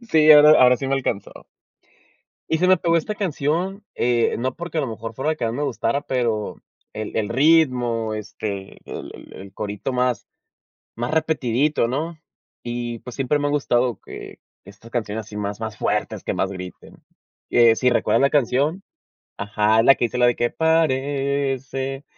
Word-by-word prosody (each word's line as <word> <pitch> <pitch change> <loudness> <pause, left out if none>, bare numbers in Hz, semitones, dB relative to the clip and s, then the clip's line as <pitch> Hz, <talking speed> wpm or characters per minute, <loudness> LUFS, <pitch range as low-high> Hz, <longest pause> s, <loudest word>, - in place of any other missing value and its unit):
Sí, 160 -10 +4
ahora 150 0 +8
ahora 125 0 +6
sí 135 - -4
me 135 - +1
alcanzó. 120 -7 -3 1.2
Y 160 - +1
se 180 - +2
me 185 0 +6
pegó 170 -2 +1
esta 190 +6 -2
canción, 185 +1 -2
eh, 120 -1 +1
no 130 +1 -2
porque 170 -1 -5
a - - +3
lo 140 - -2
mejor 115 0 -7
fuera 135 +7 -1
la 155 - -1
que 125 - -3
más 115 0 -1
me 145 - -3
gustara, 140 +1 -1
pero 120 -6 -2 0.4
el 110 -1 -6
el 105 -2 0
ritmo, 125 -5 +2
este, 100 -2 -6
el - - -8
el - - -13
el 95 0 -11
corito 105 +5 -4
más 125 -3 0 0.7
más 120 +3 -3
repetidito, 145 -4 +1
¿no?, 155 +6 -3 0.5
y 120 -1 -4
pues 125 - -10
siempre 135 +2 0
me 145 - -1
ha - - 0
gustado 125 -4 +1
que - - -10 0.3
estas 100 +3 -15
canciones 110 -2 -3
así 105 0 -11
más 100 0 -4
más 110 -1 -5
fuertes, - - -2
que - - -2
más 95 - -1
griten. 90 -1 -10 0.5
Que 115 -2 +6
si 125 +1 +2
recuerdas 120 - +2
la 140 - +4
canción 145 - +1 0.6
ajá, 105 +2 +2
la 135 - +7
que - - 0
dice 120 - -4
la 125 - +4
de 120 - +3
que 120 - 0
parece, 135 -3 -1
125 Hz, 180 wpm, -22 LUFS, 115-150 Hz, 1.2 s, ahora